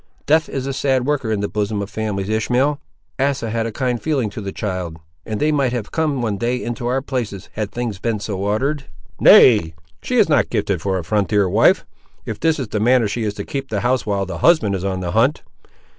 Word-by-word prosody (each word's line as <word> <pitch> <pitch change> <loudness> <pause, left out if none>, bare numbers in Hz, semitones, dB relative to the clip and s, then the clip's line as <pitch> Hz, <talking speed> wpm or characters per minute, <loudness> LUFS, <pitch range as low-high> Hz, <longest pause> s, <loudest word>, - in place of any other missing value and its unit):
Death 155 +1 +3
is 135 -1 -3
a 135 - -2
sad 130 -2 +1
worker 135 -6 0
in 105 -2 0
the 100 - 0
bosom 105 0 -2
of 100 - -3
families, 100 -2 -3
Ishmael! 125 +7 +1 0.4
Asa 135 -4 0
had 115 0 -1
a - - -4
kind 125 +1 -2
feeling 135 -9 -1
to 105 - -7
the 100 -1 -5
child, 90 -5 -4 0.3
and 110 -2 -3
they 155 - +2
might 135 -4 +1
have 120 -4 -4
come 150 -6 0
one 105 -4 -2
day 120 +3 0
into 120 0 -4
our 130 +2 0
places, 120 -9 -4
had 105 -2 -3
things 120 -5 -4
been 115 -1 -1
so 100 -1 -4
ordered." 135 +9 -1 0.3
"Nay, 95 -10 +6 0.3
she - - -3
is - - +5
not - - +2
gifted - - -1
for 95 -1 -1
a 90 - -3
frontier 100 +3 +1
wife, 90 - +3 0.4
if 110 -2 -5
this 160 0 +2
is 130 -6 -4
the 105 - -2
manner 120 +1 +3
she 115 +4 -3
is 105 -1 -2
to 100 - -5
keep 135 -1 -5
house 125 0 +1
while 100 -2 -1
the 95 - -6
husband 155 -12 +4
is 95 -2 -3
on 95 -1 -2
the 90 -1 -3
hunt. 130 - +2
115 Hz, 225 wpm, -20 LUFS, 100-130 Hz, 0.4 s, Nay